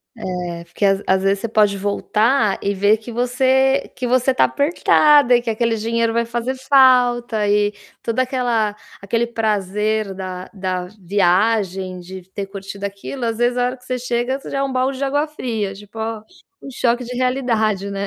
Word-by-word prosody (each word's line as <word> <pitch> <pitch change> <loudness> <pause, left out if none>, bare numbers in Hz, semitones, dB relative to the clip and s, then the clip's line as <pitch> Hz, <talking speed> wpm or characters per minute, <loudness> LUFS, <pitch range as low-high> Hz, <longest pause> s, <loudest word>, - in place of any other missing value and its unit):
É, 175 -2 -5
porque 185 +4 -4
às 195 0 +3
às 190 0 +2
vezes 195 +1 +2
você 230 - -3
pode 210 -2 +2
voltar 210 +2 +1
e 200 0 0
ver 205 +3 +3
que 225 +2 -10
você 260 +3 +1
que 250 - -3
você 255 +1 +2
tá - - +4
apertada 290 -3 +4
e 240 - +4
que 235 - -7
aquele 230 +1 +1
dinheiro 230 +1 0
vai 235 0 0
fazer 240 +2 -2
falta 250 -5 +3
e 205 0 +2 0.3
toda 230 +2 -1
aquela 240 -5 0 0.2
aquele 230 +4 0
prazer 215 -2 -1
da 185 -1 -7
da 185 -2 -3 0.2
viagem, 190 0 +1
de 180 +1 -10
ter 200 - -4
curtido 195 0 -8
aquilo, 200 +6 -5
às 225 -1 -2
vezes, 245 +1 +1
a 245 - +2
hora 250 +1 -3
que 250 - -22
você 255 0 -3
chega, 245 +1 -1
isso 275 - -10
é - - -7
já 275 0 -1
um 270 - -3
balde 260 +1 0
de 275 - -1
água 290 +2 0
fria, 230 -9 -3
tipo: 205 +2 -12
"Ó, 220 0 -3 0.4
um 275 - -8
choque 245 -1 0
de 245 +1 -6
realidade", 230 -6 0
né. 200 0 -3
225 Hz, 190 wpm, -20 LUFS, 200-250 Hz, 0.4 s, tá